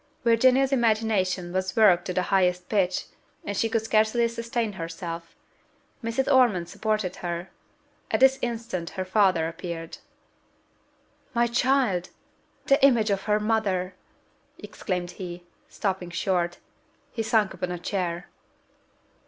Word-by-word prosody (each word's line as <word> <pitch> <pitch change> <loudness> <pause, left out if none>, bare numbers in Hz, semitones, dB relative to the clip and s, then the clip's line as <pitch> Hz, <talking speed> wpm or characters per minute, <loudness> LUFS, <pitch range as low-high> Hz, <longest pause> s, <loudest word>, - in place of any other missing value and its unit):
Virginia's 255 +3 +4
imagination 215 -7 +1
was 185 0 -2
worked 205 -6 +5
to 180 - -3
the 185 - 0
highest 180 -2 +2
pitch; 185 -4 0 0.5
she 225 +3 0
could 225 -1 0
scarcely 220 +2 +2
sustain 230 -1 -3
herself: 165 -1 -6 0.7
Mrs. 230 +4 -1
Ormond 240 -11 +4
supported 215 -4 -2
her. 175 0 -5 0.6
At - - +1
this 265 0 +5
instant 230 -7 -3
her 185 - -2
father 185 -4 +3
appeared. 165 -1 -7 1.4
"My 235 0 +4
child! 240 -6 +1 0.6
the 275 0 +3
image 235 -6 +5
of 195 -1 -1
her 210 0 +2
mother!" 205 -4 0 0.6
exclaimed 180 -2 -4
he, 175 -1 -8 0.3
stopping 190 -3 -3
short: 175 -1 -1 0.5
he 230 - -3
sunk 220 -3 +2
upon 180 -1 -4
a 180 - -3
chair. 175 -1 -3
195 Hz, 120 wpm, -26 LUFS, 180-230 Hz, 1.4 s, worked